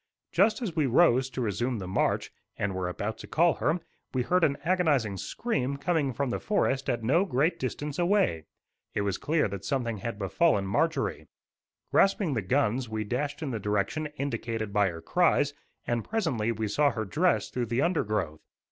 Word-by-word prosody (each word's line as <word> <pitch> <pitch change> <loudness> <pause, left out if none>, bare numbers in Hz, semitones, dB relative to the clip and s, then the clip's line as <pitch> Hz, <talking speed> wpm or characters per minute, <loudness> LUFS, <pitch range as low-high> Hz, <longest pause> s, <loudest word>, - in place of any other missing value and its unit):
Just 215 +6 +3
as 185 -8 -3
we 155 -4 +2
rose 130 -1 +4
to 130 - -4
resume 120 +3 -1
the 95 -3 -5
march, 95 - 0 0.3
and 100 -1 -1
were 95 -1 -2
about 105 +5 -4
to - - -9
call 170 0 +3
her, 160 +4 +2 0.4
we 125 - +2
heard 180 +6 +2
an 140 -3 +3
agonizing 155 - +2
scream 140 - -2
coming 150 -2 0
from 130 +1 -2
the - - -1
forest 135 -10 0
at 120 -3 -1
no 145 +11 +3
great 150 -1 +1
distance 145 +4 -4
away. 175 - +2 0.5
It - - +1
was 100 -1 -1
clear 155 -3 +1
that 100 0 -6
something 120 -5 -1
had 115 +1 -4
befallen 100 - +2
Marjorie. 160 +12 0 0.6
Grasping 195 -5 +3
the 115 - 0
guns, 125 +3 0
we 110 0 -2
dashed 140 +8 -3
in 140 - -2
the 115 - -2
direction 105 +10 -1
indicated 115 -6 -3
by 100 -2 +3
her 85 -1 -8
cries, 145 - +2 0.3
and 120 -2 -1
presently 145 - -1
we 110 -1 -2
saw 145 +8 +3
her 110 -4 -3
dress 165 - +1
through 125 -2 -2
the 120 +4 +1
undergrowth. 105 - -1
130 Hz, 185 wpm, -28 LUFS, 110-160 Hz, 0.6 s, rose